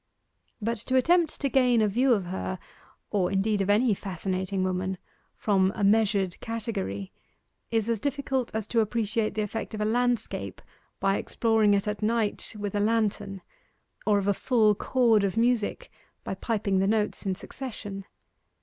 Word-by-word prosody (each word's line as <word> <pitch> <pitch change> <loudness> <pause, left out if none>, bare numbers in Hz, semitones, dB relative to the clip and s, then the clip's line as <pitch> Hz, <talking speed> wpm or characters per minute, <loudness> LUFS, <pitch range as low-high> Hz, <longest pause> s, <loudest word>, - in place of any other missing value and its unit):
But 230 +2 -1
to 260 - +1
attempt 330 +5 +3
to 280 - +2
gain 250 -3 +3
a 215 - +3
view 250 +6 +2
of 200 -5 0
her 185 +1 -4 0.5
or 190 -4 +1
indeed 200 +1 +1
of 195 - -1
any 215 +2 +4
fascinating 190 0 -3
woman 185 0 -1 0.4
from 190 -3 +2
a 210 - -2
measured 200 -3 +2
category, 205 - -4 0.6
is 225 -1 0
as 230 -2 0
difficult 270 -1 -1
as 220 -2 -1
to 235 - +2
appreciate 220 -1 0
the 215 - 0
effect 220 +1 -4
of - - -6
a - - +1
landscape 245 +1 -1 0.4
by 195 0 +2
exploring 220 -3 +2
it 200 +1 -1
at 210 0 -3
night 220 0 -1
with 205 -1 -4
a 205 - 0
lantern 205 -3 0 0.6
or 210 -1 +4
of 200 -1 -1
a 200 - +4
full 220 0 +3
chord 225 -1 +2
of 200 +2 -1
music 240 - +1 0.3
by - - -3
piping 200 -1 0
the 195 - +2
notes 210 0 0
in 190 - 0
succession. 205 -4 -7
210 Hz, 165 wpm, -27 LUFS, 195-230 Hz, 0.6 s, any